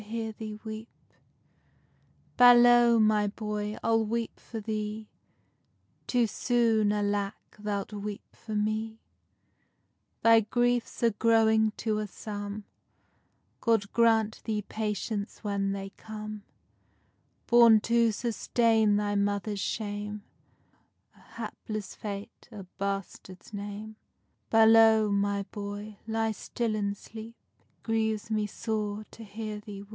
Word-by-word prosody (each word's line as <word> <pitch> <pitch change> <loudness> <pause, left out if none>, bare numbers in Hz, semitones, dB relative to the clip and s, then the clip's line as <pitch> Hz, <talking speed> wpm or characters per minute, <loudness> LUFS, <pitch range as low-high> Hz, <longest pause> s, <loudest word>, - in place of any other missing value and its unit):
_ 220 0 -6 1.5
Balow, 240 -1 +7
my 215 -1 +3
boy, 210 0 -4
I'll 225 0 +3
weep 230 +1 -3
for 225 - -7
thee; 215 0 -4 1.0
Too 245 -2 +3
soon, 225 -2 +2
alake, 205 -1 -2
thou'lt 205 0 -3
weep 205 0 -7
for 220 -2 -7
me: 215 +1 -1 1.2
Thy 230 0 +7
griefs 240 +2 0
are 230 - +5
growing 220 0 +3
to 215 -1 -1
a 210 - -3
sum, 205 +1 -6 1.0
God 220 -3 +1
grant 225 -2 +3
thee 210 -1 -2
patience 210 0 -4
when 200 -1 -1
they 195 0 -5
come; 215 -1 -8 1.0
Born 235 -2 +7
to 230 0 +3
sustain 225 -1 +2
thy 205 0 0
mother's 205 0 -1
shame, 205 0 -4 0.9
A - - -22
hapless 215 -3 -7
fate, 205 +1 -8
a 205 -3 -8 0.2
bastard's 195 0 -5
name. 205 +2 -7 0.5
Balow, 225 -1 +6
my 200 0 +1
boy, 205 +1 -7
ly 225 0 0
still 225 +1 -3
and 200 -1 -2
sleep, 225 +2 -10 0.2
It - - -39
grieves 220 -1 -1
me 215 -1 0
sore 215 -1 -3
to 225 - -11
hear 215 0 -6
thee 200 -1 -9
weep. - - -18
215 Hz, 110 wpm, -29 LUFS, 205-225 Hz, 1.5 s, Balow